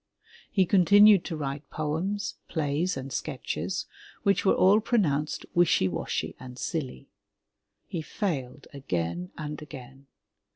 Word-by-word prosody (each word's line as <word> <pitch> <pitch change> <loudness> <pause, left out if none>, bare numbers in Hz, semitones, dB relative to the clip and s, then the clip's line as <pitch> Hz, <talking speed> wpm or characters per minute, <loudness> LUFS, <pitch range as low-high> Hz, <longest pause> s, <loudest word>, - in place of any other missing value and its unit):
He 190 -3 +3
continued 200 +1 +6
to 165 - -4
write 140 0 -5
poems, 165 +7 -2
plays 160 +2 -1
and 135 0 -6
sketches, 155 +7 -3 0.4
which 200 -2 +2
were 195 - +4
all 195 +3 +5
pronounced 160 - 0
wishy 175 - +4
washy 85 - -3
and 125 -1 -10
silly. 130 - -4 0.8
He 170 - -4
failed 150 - -3
again 90 -9 -3
and 150 -1 -5
again. 135 -2 -11
150 Hz, 120 wpm, -27 LUFS, 135-185 Hz, 0.8 s, continued